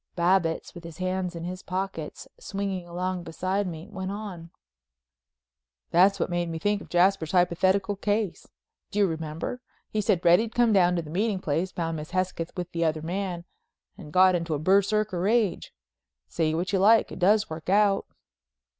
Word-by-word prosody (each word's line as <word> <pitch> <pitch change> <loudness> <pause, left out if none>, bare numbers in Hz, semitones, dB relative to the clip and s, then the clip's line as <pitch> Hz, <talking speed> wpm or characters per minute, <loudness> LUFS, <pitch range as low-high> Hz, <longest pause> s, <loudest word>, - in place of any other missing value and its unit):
Babbitts, 175 -1 +1
with 175 - -10
his 165 -1 -10
hands 185 -1 -2
in 165 - -6
his 185 +2 -5
pockets 185 -4 -5
swinging 195 -3 -4
along 180 +1 -3
beside 185 +4 -2
me, 165 +1 -7
went 190 -2 -5
on: 195 -5 -7 1.4
"That's 195 +3 +5
what's 175 - -1
made 175 -1 -1
me 165 - -4
think 205 +4 0
of - - -12
Jasper's 180 -2 +2
hypothetical 185 +3 +2
case. 205 -2 -1 0.4
Do 210 - -6
you 205 - +5
remember? 160 +7 -4 0.3
He 215 - 0
said 185 -3 +1
Reddy'd 205 +7 +4
come 240 -2 +4
down 180 -2 +4
to 170 - -1
the 150 - -10
meeting 205 +3 0
place, 170 +3 -1
found 165 -2 -3
Miss 150 0 -7
Hesketh 185 -2 -2
with 180 0 -4
the 170 0 -1
other 155 -1 0
man 175 0 -3 0.5
and 150 - -11
got 185 +2 +5
into 170 -2 -1
a - - -1
Berserker 200 +4 +2
rage. 210 +1 +1 0.6
Say 155 - 0
what 180 +4 -2
you 195 - +3
like, 220 +4 +5
it - - -8
does 210 +4 +4
work 160 +2 -6
out." 200 0 +3
185 Hz, 175 wpm, -26 LUFS, 170-200 Hz, 1.4 s, That's